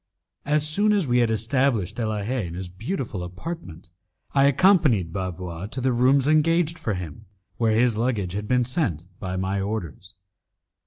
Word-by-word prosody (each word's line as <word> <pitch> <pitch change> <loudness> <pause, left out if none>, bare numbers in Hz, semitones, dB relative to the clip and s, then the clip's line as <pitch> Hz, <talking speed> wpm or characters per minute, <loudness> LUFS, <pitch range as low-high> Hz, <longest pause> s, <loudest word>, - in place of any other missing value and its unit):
As 150 +1 +1
soon 205 +7 +3
as 200 -5 +2
we 125 -2 +2
had 120 -2 +3
established 115 -2 +1
De 115 -2 -1
la 105 -2 -2
Haye 115 -3 -2
in 85 - -7
his 90 0 -5
beautiful 110 - -4
apartment, 90 - -8 0.4
I 135 -1 +4
accompanied 140 - +3
Bavois 90 -1 -5
to 120 - -5
the 130 0 +1
rooms 130 +3 +3
engaged 165 +2 +2
for 110 - -2
him, 90 -4 -8 0.3
where 110 -2 +2
his 115 -1 +2
luggage 110 -7 -1
had 105 +1 -4
been 125 0 +2
sent 115 - -1
by 95 -1 -4
my 95 +1 -1
orders. 100 -1 -5
115 Hz, 170 wpm, -24 LUFS, 95-140 Hz, 0.4 s, I